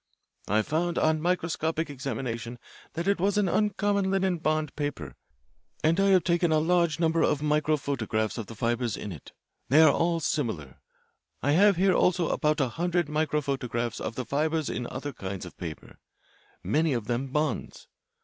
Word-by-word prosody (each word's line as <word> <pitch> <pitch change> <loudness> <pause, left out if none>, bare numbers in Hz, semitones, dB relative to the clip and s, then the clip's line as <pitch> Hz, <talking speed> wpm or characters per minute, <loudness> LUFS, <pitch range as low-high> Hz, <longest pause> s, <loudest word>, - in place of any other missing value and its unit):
"I 105 +2 +2
found 165 +5 -1
on 155 0 +2
microscopic 165 -2 -1
examination 125 -4 -4 0.4
that 170 +3 -3
it 200 -2 +2
was 200 +3 +1
an 205 -2 +3
uncommon 205 0 +1
linen 190 -2 +1
bond 155 -2 -1
paper, 145 - -4 0.7
and 165 +4 +3
I 195 - +4
have 190 -3 +5
taken 170 -1 +2
a 155 - +4
large 170 -1 +2
number 165 -1 +2
of 145 - +2
microphotographs 140 -8 0
of 110 - -5
the 115 - -9
fibres 120 0 -1
in 105 - -6
it. 80 -7 -10 0.4
They 145 - +6
are 155 -3 +7
all 170 0 +1
similar. 110 - -3 0.6
I 145 - +2
have 200 +5 +5
here 190 +2 +3
also 180 -2 +2
about 155 -1 +1
a 135 -3 +1
hundred 175 +2 -1
microphotographs 140 -6 -1
of - - -4
the 130 - -4
fibres 155 +3 0
in 120 +2 -3
other 140 +2 -5
kinds 95 -3 -6
of 90 - -11
paper, 85 -4 -8 0.6
many 150 - +1
of 120 -4 -2
them 120 +3 -2
bonds. 150 -1 -2
150 Hz, 170 wpm, -27 LUFS, 120-170 Hz, 0.7 s, are